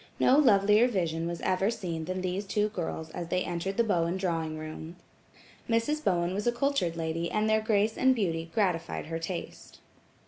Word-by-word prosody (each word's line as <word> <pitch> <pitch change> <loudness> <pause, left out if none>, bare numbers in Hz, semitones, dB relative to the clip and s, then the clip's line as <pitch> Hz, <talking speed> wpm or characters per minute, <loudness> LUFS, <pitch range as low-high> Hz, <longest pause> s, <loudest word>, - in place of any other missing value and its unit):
No 270 +3 +5
lovelier 210 -3 +5
vision 170 -7 -1
was 170 -1 -4
ever 190 +2 +1
seen 175 -8 -4
than 185 +2 -3
these 185 +2 -2
two 210 +2 +1
girls 165 -5 -5
as 170 - -5
they 180 +1 0
entered 180 +3 -3
the 235 - +4
Bowen 175 -4 +1
drawing 165 -4 -2
room. 155 +2 -7 0.7
Mrs. 265 +7 +1
Bowen 175 -2 +1
was 205 +4 -2
a - - +5
cultured 240 -8 0
lady 165 +1 -2
and 215 0 0
their 220 0 +3
grace 215 0 +1
and 260 0 +4
beauty 165 -7 -1
gratified 175 -7 -1
her 165 +1 -4
taste. 170 +1 -7
185 Hz, 180 wpm, -29 LUFS, 165-215 Hz, 0.7 s, No